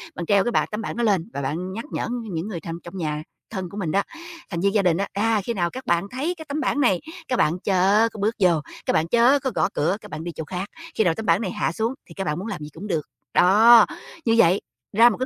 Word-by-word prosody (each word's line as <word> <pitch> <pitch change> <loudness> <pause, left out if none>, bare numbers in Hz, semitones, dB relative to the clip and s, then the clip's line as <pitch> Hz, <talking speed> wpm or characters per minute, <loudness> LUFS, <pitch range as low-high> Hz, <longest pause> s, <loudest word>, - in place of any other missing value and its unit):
bạn 175 - -4
treo 200 +1 +4
cái 240 - -1
bảng - - +2
tấm 210 +1 -3
bảng - - -4
đó 240 - -1
lên 200 -4 +1
và 140 - -3
bạn 170 +7 -3
nhắc 225 +5 -5
nhở - - -2 0.2
những 165 +2 -3
người 190 -6 -4
thân 165 0 -6
trong 175 +2 -9
nhà, 155 -3 -2 0.3
thân 190 -4 -5
của 200 - -9
mình 180 -6 -2
đó, 195 - +3 0.5
thành 170 - -3
viên 200 +1 +2
gia 210 - +4
đình 175 -3 +2
á, 200 +1 -1
à, 220 +1 +1
khi 235 - -2
nào 175 -5 0
các 260 +8 -8
bạn 175 +3 +1
thấy 295 +8 -2
cái 315 - -9
tấm 285 +2 -2
bảng 290 - 0
này, 215 -10 +3 0.3
các 255 - 0
bạn 165 +4 +2
chớ 200 +4 +3
có 215 - -9
bước 215 +3 0
vô, 185 -3 +5 0.4
các - - +1
bạn 160 +1 +2
chớ 240 +8 +4
có 265 -1 -2
gõ 155 - +2
cửa 180 +6 +1
các 210 - -12
bạn 155 0 -5
đi 170 - -4
chỗ 160 - -4
khác, 180 +4 -4 0.3
khi 220 - +3
nào 175 -4 +3
tấm 220 - -5
bảng 170 +2 +3
này 190 -5 -2
hạ - - -1
xuống 220 +8 -1
thì 165 - -12
các 195 - -4
bạn 150 -1 -2
muốn 195 - -5
làm 200 -8 -5
gì 150 - -7
cũng 185 +6 -8
được. 165 -6 0 0.3
Đó, 220 +5 +7 0.4
như 225 - +3
vậy 185 -2 +5 0.4
ra 235 +2 +8
một 225 - -3
cái 255 - -1
195 Hz, 290 wpm, -23 LUFS, 170-225 Hz, 0.5 s, ra